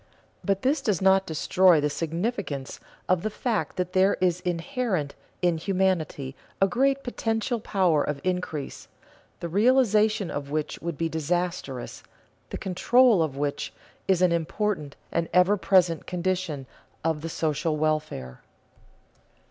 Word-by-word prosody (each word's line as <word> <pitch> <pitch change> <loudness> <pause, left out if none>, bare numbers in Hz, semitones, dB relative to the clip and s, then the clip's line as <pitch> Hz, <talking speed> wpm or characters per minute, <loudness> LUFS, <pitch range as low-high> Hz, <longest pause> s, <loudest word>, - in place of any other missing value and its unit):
But 195 -1 0
this 275 +4 +2
does 205 -6 0
not 190 0 +4
destroy 170 +2 +4
the 150 - +1
significance 165 - -3 0.3
of 185 -2 +2
the 215 - -1
fact 220 +1 -2
that 180 0 -3
there 190 +1 +4
is 180 -1 +2
inherent 180 - -2 0.3
in 175 -2 +2
humanity 170 -7 -1 0.2
a 195 - +5
great 270 +5 +1
potential 225 0 -1
power 180 -8 +2
of 150 -1 -3
increase, 180 -6 -3 0.5
the 170 - -2
realization 215 0 +3
of 140 -1 -4
which 155 0 -3
would 170 -3 -4
be 165 - 0
disastrous, 160 -4 -3 0.5
the - - -5
control 220 +3 +4
of 150 -4 -1
which 145 0 -2 0.4
is 185 -2 +3
an 180 - +4
important 170 -2 -1 0.2
and 170 0 -1
ever 180 +3 +5
present 180 -4 +2
condition 180 -5 -2 0.4
of 160 -2 0
the 165 - -4
social 155 0 -1
welfare. 150 - -2
180 Hz, 135 wpm, -26 LUFS, 155-200 Hz, 0.5 s, a